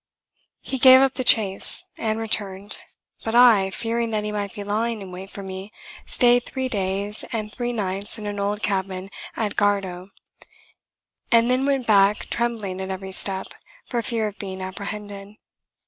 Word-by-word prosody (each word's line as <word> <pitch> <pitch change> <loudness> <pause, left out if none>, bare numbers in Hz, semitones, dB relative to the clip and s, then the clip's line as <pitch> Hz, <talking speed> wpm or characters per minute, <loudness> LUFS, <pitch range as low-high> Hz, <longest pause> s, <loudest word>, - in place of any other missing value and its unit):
] - - -46
He 265 - -1
gave 260 +1 +9
up 270 0 +3
the 255 - -1
chase, 205 -5 +3
and 220 -1 -2
returned: 205 -3 0 0.4
but 225 +1 -2
I, 230 -6 +6
fearing 230 +3 -2
that 215 -1 -1
he 210 - -3
might 205 -1 -4
be 205 - -5
lying 220 +3 -1
in 195 -2 -9
wait 185 +2 -8
for 200 - -8
me, 190 +2 -7 0.4
stayed 245 -1 +4
three 260 0 -3
days 200 -1 -1
and 215 -2 -3
three 245 +1 -3
nights 200 -2 -2
in 215 - -7
an 205 -1 -4
old 205 +1 -2
cabin 190 -1 -2 0.2
at 215 -2 -2
Gardow, 195 -3 0 1.2
and 235 +1 +5
then 260 +2 +1
went 270 -3 0
back 205 -1 +3
trembling 220 -6 -2
at 190 - -5
every 190 0 -5
step 190 0 0 0.4
for 240 -2 -2
fear 230 -1 -1
of 210 0 -6
being 190 -1 -6
apprehended. 200 +1 -7
205 Hz, 170 wpm, -23 LUFS, 195-230 Hz, 1.2 s, gave